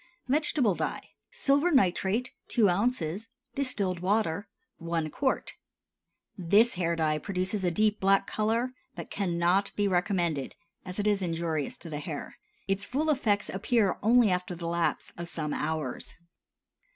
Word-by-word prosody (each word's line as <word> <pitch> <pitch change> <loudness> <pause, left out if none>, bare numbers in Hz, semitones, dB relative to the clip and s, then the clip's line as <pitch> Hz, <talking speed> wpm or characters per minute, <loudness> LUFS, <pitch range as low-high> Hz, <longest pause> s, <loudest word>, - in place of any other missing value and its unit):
VEGETABLE 275 -5 +2
DYE. - - -4 0.2
Silver 285 +5 +2
nitrate 225 - +2
2 225 -4 +3
oz. 205 -1 -1 0.2
Distilled 210 -10 -1
water 200 0 0 0.3
1 165 -2 -2
qt. 265 -2 -1 0.8
This 205 +6 +4
hair 170 -2 0
dye 155 -2 +1
produces 185 +3 -2
a 180 - +3
deep 215 +4 +1
black 195 0 +3
color, 225 +4 0 0.2
but - - -8
cannot 180 +1 +1
be 205 -1 +1
recommended, 175 -6 0 0.3
as 185 -1 -7
it 205 - -1
is 205 -2 +2
injurious 165 -4 -2
to - - -11
the 150 - -3
hair. 150 -1 -6 0.3
Its 195 +1 0
full 300 +8 0
effects 210 -7 +1
appear 205 0 +1
only 230 -1 +5
after 180 0 -1
the 170 0 -7
lapse 170 0 -1
of 170 0 -5
some 155 -3 -3
hours. 155 -4 -3
190 Hz, 140 wpm, -29 LUFS, 170-220 Hz, 0.8 s, only